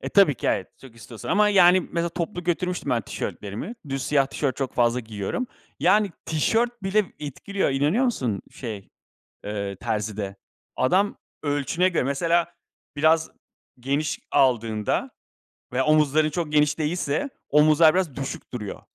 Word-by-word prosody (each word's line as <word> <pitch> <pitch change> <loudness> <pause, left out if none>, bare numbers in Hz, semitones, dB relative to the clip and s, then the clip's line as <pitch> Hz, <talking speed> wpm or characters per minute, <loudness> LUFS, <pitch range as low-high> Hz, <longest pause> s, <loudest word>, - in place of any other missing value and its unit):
e, - - -4
tabii 195 -8 +5
ki - - -5
evet, 95 - 0
çok 130 -4 -14
istiyorsan 115 -1 -10
ama, 210 0 +4
yani, 185 -2 +6
mesela 170 -1 -2
toplu 175 +2 -4
götürmüştüm 180 +1 -1
ben 120 - +2
tişörtlerimi. 105 - -5
Düz 135 -1 -2
siyah 140 -2 +2
tişört 135 -1 -2
çok 135 -3 -3
fazla 120 0 +2
giyiyorum. 110 - -4 0.3
Yani 210 -1 +4 0.2
tişört 230 +9 0
bile 200 +2 +2
etkiliyor. 150 +7 -2
İnanıyor 150 - +2
musun, 125 - -1
şey, 110 -6 -7 0.6
ııı, 100 -1 -3
terzide. 105 -2 -3 0.4
Adam 190 +10 +2 0.3
ölçüne 145 +5 +1
göre 170 - 0
mesela 165 +5 +1 0.4
biraz 160 +2 +3 0.5
geniş 140 +4 -1
aldığında 115 -6 +1 0.6
veya 130 +1 +1
omuzların 155 0 +3
çok 155 0 -3
geniş 150 0 +3
değilse 155 - -1 0.2
omuzlar 155 +1 +6
biraz 180 -8 0
düşük 135 -1 -6
duruyor. 105 -5 -5
150 Hz, 140 wpm, -24 LUFS, 125-175 Hz, 0.6 s, yani